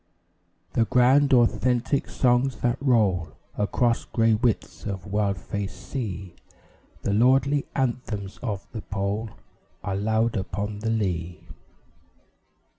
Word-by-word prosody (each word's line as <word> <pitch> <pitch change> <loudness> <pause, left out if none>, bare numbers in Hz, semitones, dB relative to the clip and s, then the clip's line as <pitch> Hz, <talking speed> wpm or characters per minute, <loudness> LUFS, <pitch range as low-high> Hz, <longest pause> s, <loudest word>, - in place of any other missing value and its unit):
The 115 - +3
grand, 130 +4 +4
authentic 125 +2 +2
songs 125 -1 +2
that 120 +1 +1
roll 100 - +2 0.2
Across 115 +3 +1
grey 115 -1 +2
widths 105 -7 -1
of 95 -2 -4
wild 100 -1 0
faced 100 +3 -6
sea, 100 -9 -4 0.7
The 100 - 0
lordly 135 +5 +3
anthems 115 -6 -2
of 105 -5 -3
the 110 - -5
Pole, 100 +2 -2 0.5
Are 100 - -2
loud 110 +3 +1
upon 100 +1 -3
the 110 +1 -2
lea. 90 -6 -2
110 Hz, 115 wpm, -25 LUFS, 100-125 Hz, 0.7 s, grand